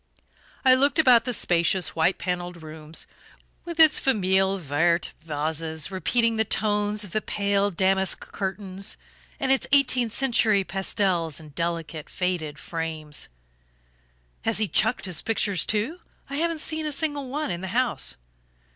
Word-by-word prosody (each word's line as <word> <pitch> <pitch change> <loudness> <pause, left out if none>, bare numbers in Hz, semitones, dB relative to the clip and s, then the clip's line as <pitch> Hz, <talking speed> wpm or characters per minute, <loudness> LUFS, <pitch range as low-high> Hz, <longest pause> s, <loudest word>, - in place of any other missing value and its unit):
I 260 - +8
looked 275 +3 +3
about 250 -7 +6
the 250 - -1
spacious 175 -4 +2
white 165 +3 +2
panelled 175 -2 -4
room, 155 0 -11 0.7
with 340 -1 -7
its 315 -2 +6
FAMILLE 190 -5 +2
VERTE 170 +1 0
vases 160 +1 -2
repeating 230 +5 +1
the 220 - +3
tones 210 0 0
of 200 - -10
the 215 - -1
pale 200 -1 0
damask 190 0 +2
curtains, 195 0 -2 0.4
and 265 -1 +1
its 270 - +2
eighteenth 255 -4 +3
century 230 -5 +3
pastels 185 -3 -1
in 155 -1 -12
delicate 165 0 -4
faded 175 -5 -2
frames. 160 -2 -5 1.1
"Has - - +1
he 215 0 +1
chucked 220 +5 +2
his 180 -4 +1
pictures 205 -5 0
too? 225 +12 0 0.3
I 280 - -2
haven't 330 0 -1
seen 315 -1 -1
a - - -2
single 290 -2 -2
one 295 -3 -2
in 175 0 -4
the 190 - -4
house." 185 - -1
195 Hz, 145 wpm, -25 LUFS, 170-240 Hz, 1.1 s, I